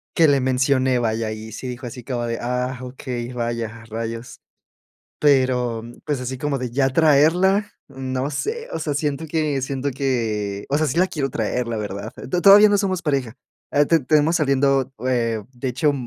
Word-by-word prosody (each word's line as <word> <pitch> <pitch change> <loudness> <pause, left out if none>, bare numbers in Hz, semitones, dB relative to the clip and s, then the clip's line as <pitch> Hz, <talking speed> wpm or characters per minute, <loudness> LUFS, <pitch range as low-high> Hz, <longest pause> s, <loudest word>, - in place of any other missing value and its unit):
que 160 -3 +5
le 140 - +4
mencioné. 130 0 +2
Vaya, 110 -1 -1
y 110 +1 -8
si 130 +4 -6
dijo 125 0 -6
así: 120 0 -8 0.3
"Ah 125 +1 -2
okey, 125 -1 -5
vaya 115 -1 -3
rayos". 115 +2 -5 0.8
Pero 130 -5 +2 0.2
pues 145 -4 -1
así 125 +1 -4
como 145 0 -1
de 125 -2 -4
ya 135 +2 +2
traerla. 165 +8 +4 0.2
No 130 0 -3
sé. 455 - -3
O - - -3
sea, 150 - -2
siento 145 +1 -2
que 150 -3 0
siento 135 +1 -2
que, 110 -7 -2
o 140 - +2
sea, 155 0 +1
sí 140 - -2
la 185 +2 +4
quiero 140 -6 -2
traer 115 +2 -2
la 115 - -2
verdad. 105 +1 -5
T - - -10
todavía 205 +2 +8
no 205 - +3
somos 190 -3 -1
pareja. 135 -7 -1 0.4
Ah, 145 - +4
te 165 +2 +3
te 130 - -13
tenemos 155 +4 +3
saliendo, 135 -2 +2
eh, 115 -4 0
de 130 +1 -5
hecho, 140 +4 +1
130 Hz, 180 wpm, -22 LUFS, 120-150 Hz, 0.8 s, todavía